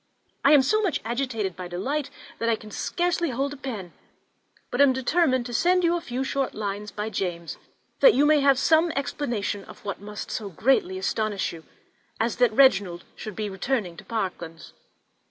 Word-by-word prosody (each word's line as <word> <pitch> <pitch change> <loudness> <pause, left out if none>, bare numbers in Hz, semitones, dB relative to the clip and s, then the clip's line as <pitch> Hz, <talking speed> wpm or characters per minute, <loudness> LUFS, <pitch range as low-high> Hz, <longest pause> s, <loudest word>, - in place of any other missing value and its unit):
I 280 - +6
am 285 -3 +7
so 430 +11 +2
much 380 -9 0
agitated 230 -6 -2
by 180 -1 -6
delight 270 +12 -2 0.3
that 230 - 0
I 230 - +3
can 215 -1 -12
scarcely 345 - -1
hold 275 +3 -2
a - - -7
pen; 220 -10 -6 0.8
but 245 - +1
am 280 -2 +6
determined 260 -1 +1
to 240 - -6
send 360 +7 +3
you 340 0 +3
a 345 - -2
few 255 -4 -3
short 270 0 -2
lines 210 0 -4
by 210 +2 -4
James, 175 -4 -4 0.4
that - - +7
you 290 - +4
may 300 0 +5
have 275 -1 +4
some 320 +4 +4
explanation 240 -8 -2
of - - -14
what 200 -1 -4
must 210 +1 -7
so 205 -2 -4
greatly 190 0 +1
astonish 205 0 -1
you, 165 -1 -11 0.5
as 225 +1 0
that 245 -2 +4
Reginald 200 -8 +4
should 215 -3 -7
be 215 -1 -2
returning 195 -1 -2
to - - -10
Parklands. 180 -7 -5
235 Hz, 185 wpm, -25 LUFS, 200-275 Hz, 0.8 s, am